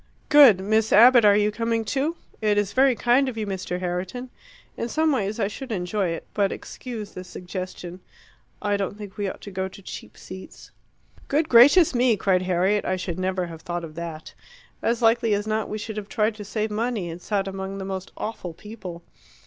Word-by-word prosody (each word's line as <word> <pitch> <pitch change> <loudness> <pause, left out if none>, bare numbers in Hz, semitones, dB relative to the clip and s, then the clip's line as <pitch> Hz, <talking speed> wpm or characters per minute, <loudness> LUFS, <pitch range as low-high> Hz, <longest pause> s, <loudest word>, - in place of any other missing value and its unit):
"Good. 280 -10 +8
Miss 220 +2 +1
Abbott, 240 +1 +7
you 210 0 +2
are - - -4
coming 230 +1 -1
too?" 285 +8 -1 0.3
"It 210 -1 +2
is 205 -1 0
very 265 -1 +4
kind 250 +4 +3
of 235 - -8
you, 215 - -2
Mr. 185 -2 -4
Herriton. 185 +8 -4 0.4
In 235 - -3
some 315 +4 +2
ways 215 -4 -1
I 200 - +2
should 255 +5 -7
enjoy 190 0 -1
it; 165 -1 -4
but 200 -2 +1
excuse 225 -5 -7
the 185 - -8
suggestion 180 0 -7 0.6
I 205 -1 +1
don't 200 0 -3
think 205 -3 -9
we 205 -2 -1
ought - - -9
to 200 - -9
go 190 0 -2
to 190 - -13
cheap - - -9
seats." 190 0 -11 0.6
"Good 305 +3 +1
gracious 280 +8 +7
me!" 240 -2 +3
cried 190 -2 +2
Harriet, 185 +3 +1
"I 185 - 0
should 185 -1 -4
never 185 -1 -1
have 165 -2 -9
thought 175 0 -4
of 160 -2 -8
that. 165 -1 -7 0.5
As 235 +1 0
likely 225 -1 +4
as 205 +1 -2
not, 215 0 -1
we 215 - -3
should 215 0 -6
have 210 -1 -6
tried 215 +1 +1
to 210 0 -9
save 215 +1 -3
money 220 -3 -1
and 170 +1 -7
sat 195 -1 -1
among 195 0 -5
the 195 - -5
most 190 -1 -5
awful 180 -6 -5
people. 185 -5 -9
205 Hz, 205 wpm, -24 LUFS, 185-230 Hz, 0.6 s, Good